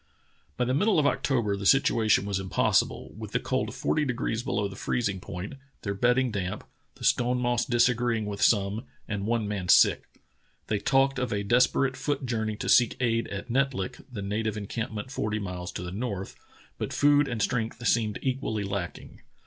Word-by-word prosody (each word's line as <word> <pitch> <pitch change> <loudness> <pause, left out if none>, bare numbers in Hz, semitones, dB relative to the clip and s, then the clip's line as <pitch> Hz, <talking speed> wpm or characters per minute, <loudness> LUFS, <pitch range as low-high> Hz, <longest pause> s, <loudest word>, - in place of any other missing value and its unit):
By 125 - +1
the 130 - 0
middle 205 +9 +3
of 150 - +3
October 120 -7 +1
the 100 0 -2
situation 110 -6 +4
was 100 -2 -1
impossi 100 +2 +2
ble, - - -9
with - - -7
the - - +2
cold - - -2
forty 155 - 0
degrees 125 -4 -1
below 105 -3 -1
the 95 - -9
freezing 100 -2 -1
point, 90 +8 -7 0.3
their 100 - -2
bedding 125 +4 +2
damp, 95 -3 -3 0.3
the - - -13
stone 125 0 +2
moss 120 -1 +1
disagreeing 120 -2 +2
with 100 -1 -5
some, 105 +2 +2 0.2
and 100 -1 -3
one 115 -2 0
man 95 -4 -3
sick. - - +5 0.6
They 105 - -1
talked 135 +4 +2
of 125 -2 -2
a 100 -1 -1
desper 125 +5 +3
ate 130 - -7
foot 145 -1 -2
journey 110 -3 -1
to - - -5
seek 120 -2 +4
aid 115 -2 +1
at 100 +4 -6
Netlik, 130 -7 -1
the 105 -5 -5
native 110 +2 -2
encampment 110 +3 -4
forty 110 -5 -2
miles 90 -3 -5
to - - -5
the 90 - -5
north, 100 -2 -4 0.4
but - - -3
food 145 0 +4
and 120 -4 -3
strength 115 +1 -1
seemed 110 -3 +2
equally 125 -5 -1
lacking. 100 -3 -5
115 Hz, 185 wpm, -27 LUFS, 100-125 Hz, 0.6 s, sick